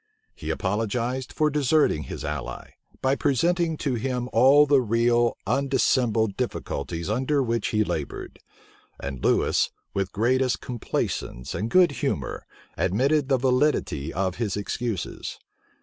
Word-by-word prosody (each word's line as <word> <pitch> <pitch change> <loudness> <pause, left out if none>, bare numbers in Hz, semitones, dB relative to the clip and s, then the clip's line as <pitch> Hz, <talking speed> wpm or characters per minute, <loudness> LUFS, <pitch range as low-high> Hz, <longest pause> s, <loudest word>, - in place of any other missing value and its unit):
He - - -7
apologized 115 +6 -1
for 155 0 +1
deserting 145 - +2
his - - -6
ally, - - -5 0.3
by 130 - +3
representing 165 +5 +1
to 140 -3 -1
him 125 +1 -2
all 135 +5 +6
the 140 -2 +4
real, 120 +1 +2
undissembled 125 -6 +1
difficulties 85 - -3
under 130 +6 +1
which 115 -3 -1
he 110 0 +2
labored; 75 -8 -5 0.6
and 65 -2 -6
Lewis, - - +2 0.2
with 100 -1 0
the 95 - -34
greatest 125 +4 +1
complaisance 105 - -3
and 110 +3 -2
good 180 0 +5
humor, - - -3 0.3
admitted 135 +9 +1
the 135 - +4
validity 125 - +1
of 95 -1 -2
his 105 -5 -1
excuses. 105 -1 -4
120 Hz, 130 wpm, -25 LUFS, 105-135 Hz, 0.6 s, all